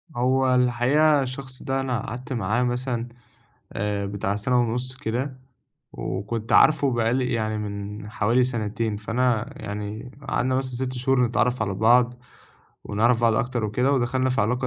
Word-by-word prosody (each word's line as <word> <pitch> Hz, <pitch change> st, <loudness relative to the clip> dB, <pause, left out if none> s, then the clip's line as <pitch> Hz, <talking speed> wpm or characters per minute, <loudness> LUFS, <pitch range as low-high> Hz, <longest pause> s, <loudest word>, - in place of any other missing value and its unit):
هو 130 Hz, +1 st, +2 dB
الحقيقة 130 Hz, +5 st, +3 dB
الشخص 130 Hz, 0 st, -6 dB
ده 135 Hz, 0 st, -1 dB
أنا 125 Hz, -4 st, -1 dB
قعدت 130 Hz, +4 st, -6 dB
معاه 115 Hz, +2 st, 0 dB
مثلًا 125 Hz, -1 st, -2 dB, 0.7 s
آآ، 100 Hz, -1 st, -2 dB
بتاع 100 Hz, 0 st, -2 dB
سَنة 125 Hz, +4 st, +1 dB
ونُص 125 Hz, +2 st, -1 dB
كده 130 Hz, +1 st, -3 dB, 0.5 s
وكنت 105 Hz, +5 st, -4 dB
عارفه 145 Hz, -3 st, +5 dB
بقى 115 Hz, 0 st, +1 dB
لي 125 Hz, -2 st, 0 dB
يعني 110 Hz, -1 st, -1 dB
من 105 Hz, 0 st, -6 dB
حوالي 115 Hz, +4 st, +2 dB
سَنتين، 110 Hz, -3 st, -2 dB
فأنا 120 Hz, +3 st, 0 dB
يعني 105 Hz, +4 st, -5 dB, 0.2 s
قعدنا 130 Hz, 0 st, +1 dB
مثلًا 130 Hz, -1 st, -1 dB
6 130 Hz, 0 st, -2 dB
شهور 125 Hz, 0 st, +2 dB
نتعرّف 125 Hz, +1 st, +1 dB
على 95 Hz, -, -1 dB
بعض 120 Hz, +4 st, +3 dB, 0.7 s
ونعرف 115 Hz, +3 st, +2 dB
بعض 115 Hz, -1 st, +3 dB
أكتر 120 Hz, -1 st, -1 dB
وكده 125 Hz, +7 st, +1 dB
ودخلنا 130 Hz, 0 st, +1 dB
في 125 Hz, -, +1 dB
علاقة 125 Hz, +5 st, 0 dB
120 Hz, 150 wpm, -24 LUFS, 110-130 Hz, 0.7 s, عارفه